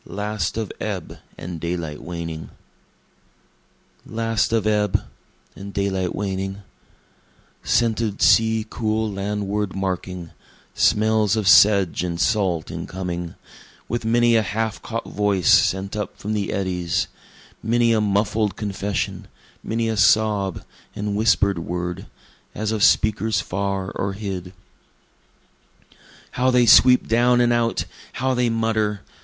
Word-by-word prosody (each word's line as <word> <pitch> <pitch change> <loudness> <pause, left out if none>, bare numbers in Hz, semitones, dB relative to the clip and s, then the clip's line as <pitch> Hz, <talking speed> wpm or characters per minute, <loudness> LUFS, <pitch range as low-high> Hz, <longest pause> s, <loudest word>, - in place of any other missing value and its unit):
[IV] - - -15
Last 105 -1 -2
of 110 -3 -3
Ebb, - - -5 0.2
and 85 -1 -7
Daylight 85 -3 -4
Waning 85 -2 -6 1.5
Last 115 -1 -1
of 115 -2 +1
ebb, 105 -2 +1 0.5
and 100 +1 -8
daylight 95 -3 -1
waning, 95 0 -4 1.0
Scented 115 -3 0
sea 110 -1 +4
cool 110 -1 -1
landward 100 0 -3
making, 90 -3 -4 0.4
smells 110 -1 +2
of 110 -3 -1
sedge 100 -4 +5
and 85 -1 -3
salt 95 -8 0
incoming, 90 -2 -5 0.5
With 120 +1 -3
many 120 +1 +3
a 110 - +4
half 110 +1 -3
caught 115 0 -5
voice 100 -5 0
sent 95 +2 +2
up 105 -2 -4
from 105 +2 -4
the 105 -2 -2
eddies, 90 -4 -1 0.5
Many 115 +1 +2
a 110 - +2
muffled 105 0 0
confession 100 -2 -3 0.3
many 115 +1 -2
a 110 -1 -1
sob 105 -3 +2 0.3
and 105 0 -3
whisper'd 100 -4 +2
word, 90 +1 -4 0.5
As 110 0 -2
of 110 -2 -2
speakers 110 0 +3
far 95 0 -3
or 100 0 -3
hid. 95 -3 -5 1.8
How 130 +1 +1
they 125 -1 +4
sweep 125 +2 +6
down 120 +2 +3
and 120 0 +3
out! 115 -1 0 0.3
how 130 +2 0
they 125 -1 +1
mutter! 110 -2 0
105 Hz, 125 wpm, -22 LUFS, 95-110 Hz, 1.8 s, sweep